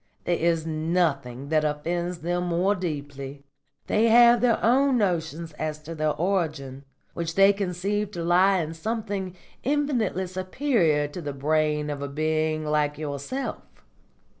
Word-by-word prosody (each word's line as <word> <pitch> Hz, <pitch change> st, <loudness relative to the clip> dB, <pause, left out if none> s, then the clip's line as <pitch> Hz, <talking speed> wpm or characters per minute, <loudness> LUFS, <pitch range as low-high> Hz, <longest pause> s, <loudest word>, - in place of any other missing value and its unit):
There 175 Hz, -, +1 dB
is 165 Hz, -1 st, +1 dB
nothing 155 Hz, -5 st, -1 dB
that 155 Hz, -1 st, +2 dB
offends 170 Hz, +4 st, -2 dB
them 175 Hz, +2 st, -1 dB
more 175 Hz, +4 st, +2 dB
deeply. 145 Hz, -6 st, -5 dB, 0.4 s
They 215 Hz, +2 st, +2 dB
have 235 Hz, 0 st, +7 dB
their 240 Hz, -2 st, +3 dB
own 265 Hz, +2 st, +4 dB
notions 165 Hz, -5 st, -1 dB
as 155 Hz, -1 st, -2 dB
to 165 Hz, +2 st, -7 dB
their 155 Hz, -1 st, 0 dB
origin, 155 Hz, -7 st, -2 dB, 0.3 s
which 165 Hz, -1 st, -4 dB
they 195 Hz, +1 st, +6 dB
conceive 200 Hz, +2 st, -2 dB
to 170 Hz, -, -4 dB
lie 185 Hz, +3 st, +4 dB
in 160 Hz, 0 st, -4 dB
something 195 Hz, 0 st, -3 dB, 0.3 s
infinitely 260 Hz, -9 st, 0 dB
superior 185 Hz, -, +1 dB
to 175 Hz, +4 st, -7 dB
the 145 Hz, -3 st, -4 dB
brain 150 Hz, +1 st, 0 dB
of 145 Hz, -1 st, -5 dB
a 140 Hz, -, -3 dB
being 155 Hz, +1 st, -1 dB
like 150 Hz, -1 st, 0 dB
yourself. 150 Hz, -, -4 dB
170 Hz, 140 wpm, -25 LUFS, 150-195 Hz, 0.4 s, have